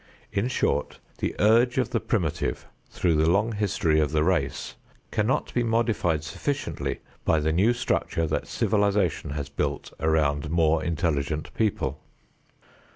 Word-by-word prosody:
In 100 +4 0
short 125 - 0 0.2
the - - -2
urge 120 +4 +4
of 130 -3 +1
the - - +1
primitive 85 -9 -1 0.2
through 85 - +1
the 80 +1 +3
long 105 +6 +2
history 95 -7 +1
of 75 -2 +1
the 75 -1 +3
race 80 -6 0 0.4
cannot 110 +5 0
be 120 - +2
modified 115 -9 +1
sufficiently 135 - -3 0.2
by 80 - +3
the 80 +1 +1
new 100 +8 +4
structure 120 -8 0
that 80 - -2
civilization 100 -7 +1
has 70 0 -4
built 70 0 -3
around 75 -2 +1
more 80 -1 +2
intelligent 75 -3 -1
people. 75 - -1
85 Hz, 140 wpm, -26 LUFS, 75-110 Hz, 0.4 s, urge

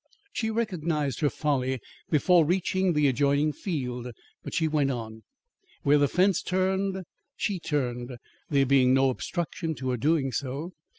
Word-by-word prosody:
She 220 - -1
recognised 170 - -1
her 145 - +2
folly 130 -4 -1 0.3
before 170 +3 +4
reaching 185 +2 +1
the 150 -2 +3
adjoining 140 +3 +2
field. 125 - -4 0.4
But - - -6
she 160 - +2
went 150 -3 +1
on. 110 -3 -5 0.6
Where 145 -1 +5
the 145 - +4
fence 185 +4 +2
turned, 190 +1 0 0.3
she 200 -4 -1
turned, 125 -5 -2 0.3
there 140 -2 +3
being 130 -1 +4
no 135 0 +4
obstruction 165 +3 -3
to 130 -1 -3
her 125 - -1
doing 140 +1 +1
so. 140 +7 -4
150 Hz, 145 wpm, -27 LUFS, 130-175 Hz, 0.6 s, Where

